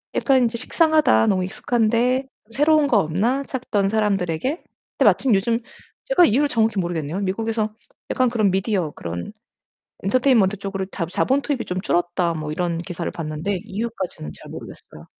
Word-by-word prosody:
'약간 265 -2 +3
인제 235 0 0
식상하다. 310 -2 +3
너무 190 -3 +2
익숙한데 240 +6 +1 0.2
새로운 295 +4 +3
거 245 - +3
없나?' 205 - +1
찾던 235 -7 -1
사람들에게 195 -4 0 0.5
근데 - - +3
마침 260 -4 +4
요즘 230 +4 +1 0.5
제가 - - +5
이유를 285 +5 +2
정확히 225 -5 +1
모르겠네요. 170 -1 -2
미국에서 215 +2 -1 0.4
약간 255 -1 +2
그런 215 -5 +2
미디어 190 -4 0
그런 85 -5 -6 0.7
'엔터테인먼트 220 -2 +3
쪽으로 195 -1 -4
다 185 -3 -4
자본 265 +10 +1
투입이 280 -5 -2
좀 180 +1 -2
줄었다.' 175 -2 0
뭐 155 -1 -4
이런 170 +1 -1
기사를 175 -1 -4
봤는데 165 +4 -3
이유까지는 195 - -5
잘 - - -12
모르겠어요. 75 - -11
210 Hz, 385 characters per minute, -22 LUFS, 180-245 Hz, 0.7 s, 제가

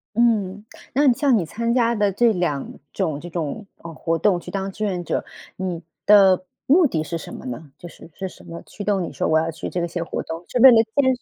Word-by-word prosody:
嗯， 210 -4 +1 0.3
那 275 +1 +4
像 265 -1 +3
你 180 - -1
参 230 +7 -2
加 235 -1 +2
的 205 -2 +2
这 230 +4 +3
2 175 -7 -2 0.2
种 160 -7 -2
这 175 - -8
种， 170 +5 -4
呃， 165 0 -10
活 165 +1 -1
动 190 -2 +2
去 - - -9
当 195 0 -3
志 215 - -6
愿 185 -4 -2
者， - - -1 0.3
你 180 -3 -4 0.2
的 190 -3 +6 0.2
目 335 +6 +5
的 165 - 0
是 165 +2 -4
什 165 - -9
么 - - -9
呢？ 135 +4 -7
就 175 - -10
是， 170 - -14
是 190 - -5
什 - - -14
么 170 0 -9
驱 205 - -9
动 200 -2 +1
你 - - -6
说 - - -1
我 160 0 +4
要 165 +1 -1
去 160 - -6
这 175 -1 -2
些 170 0 -4
活 - - -4
动， 165 +1 -7
是 250 - -1
为 265 - +10
了 245 - +7 0.2
见 260 -2 +3
识？ 245 - -20
190 Hz, 255 characters per minute, -22 LUFS, 165-230 Hz, 0.3 s, 为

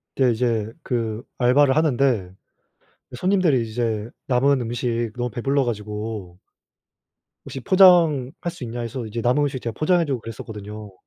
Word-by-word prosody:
근데 130 -2 +3
이제 115 -2 -1
그 115 -2 -2
알바를 130 +2 +4
하는데 130 - +1 0.8
손님들이 160 - +2
이제 110 -1 -2 0.2
남은 135 +1 +2
음식 120 -1 -2
너무 125 0 -2
배불러 135 +5 0
가지고 105 -4 -5 1.1
"혹시 135 - -6
포장할 170 -7 +5 0.2
수 170 -6 -10
있냐?" 120 +1 -5
해서 120 +1 -5
이제 115 +2 -4
남은 125 +5 +2
음식 140 -3 -2
제가 115 - -4
포장해 175 +2 +3
주고 135 -4 -2
그랬었거든요. 105 -2 -8
120 Hz, 315 characters per minute, -22 LUFS, 110-140 Hz, 1.1 s, 포장할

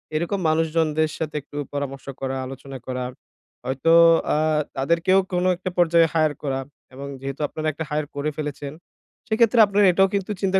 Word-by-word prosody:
এরকম 170 +5 -1
মানুষজনদের 160 -1 +1
সাথে 155 -1 -4
একটু 145 +1 -11 0.2
পরামর্শ 140 -1 -4 0.2
করা, 135 0 -2
আলোচনা 135 +1 -8
করা 125 -1 -3 0.6
হয়তো 135 +6 +1 0.4
আ - - +2 0.4
তাদেরকেও 170 +7 +3
কোনো 180 +1 +1
একটা 185 - -4
পর্যায়ে 170 -1 +4
হায়ার 155 -2 +2
করা 135 -2 -1 0.3
এবং 140 +2 -7
যেহেতু 135 +2 -5
আপনারা 155 +2 -4
একটা 155 +2 -5
হায়ার 150 0 -1
করে 145 +2 -1
ফেলেছেন 145 -1 -5 0.5
সেক্ষেত্রে 230 +1 +3
আপনারা 200 0 +3
এটাও 195 +2 +4
কিন্তু 200 +1 -1
চিন্তা 190 0 +2
155 Hz, 160 wpm, -23 LUFS, 140-175 Hz, 0.6 s, পর্যায়ে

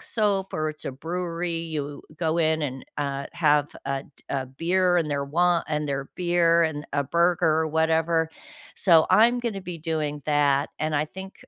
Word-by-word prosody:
soap 200 -4 0
or 155 0 0
it's 155 0 -7
a - - -3
brewery, 170 +3 -3
you 150 -3 -4 0.2
go 165 0 0
in 160 -1 +2
and, 135 -2 -4
uh, 140 -1 -2
have 150 -3 +3 0.2
a 135 0 -2
t - - -15
a 135 -2 -2
beer 175 +6 +1
and 155 -3 0
their 140 -1 -1
wi 175 +4 +2
and 150 -1 -2
their 135 0 -3
beer 175 -1 +3
and 150 -2 -2
a 145 0 +1
burger 170 +4 +2 0.2
or - - -1
whatever. 160 +1 +1 0.5
So, 165 -4 +5
I'm 235 +5 +5
gonna 220 -5 -3
be 180 -2 -6
doing 150 -3 -3
that 145 -1 +2
and 155 0 -1
I 150 +1 +2
think 190 +4 -9
160 Hz, 185 wpm, -25 LUFS, 145-175 Hz, 0.5 s, So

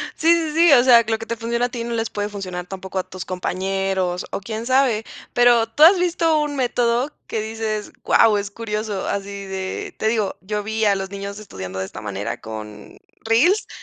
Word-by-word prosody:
Sí, 325 +1 +3
sí, 320 -2 -2
sí, 335 +1 +5
o 245 -3 +7
sea, 240 -2 +7
lo 225 0 +1
que 225 - -7
te 230 - -3
funciona 235 +1 -1
a - - -2
ti, 240 -2 -5
no 235 0 -4
les 225 0 -1
puede 205 0 -3
funcionar, 185 -3 -6
tampoco, 190 0 -5
a - - -1
tus 185 -1 -7
compañeros 185 0 -2
o - - -2
quién 220 +3 -5
sabe. 255 -4 +2 0.3
Pero, 240 -2 +5
¿tú 230 +7 +2
has 360 +5 +9
visto 335 -3 +2
un 295 -1 -2
método 245 0 +1 0.2
que 220 - -2
dices: 220 -1 -4
"Guau, 215 -2 +5
es 200 -1 -4
curioso"?, 210 -2 -3
así 200 0 -4
de 190 - -5
te 220 - -1
digo, 220 -3 0
yo 210 +2 -3
vi 220 +1 -1
a 200 -1 +4
los 195 0 -4
niños 200 +1 -6
estudiando 95 - -7
de 95 - -2
esta - - -9
manera 100 +2 -4
con 110 - -9 0.3
reels, 320 - +3
215 Hz, 210 wpm, -21 LUFS, 195-240 Hz, 0.3 s, has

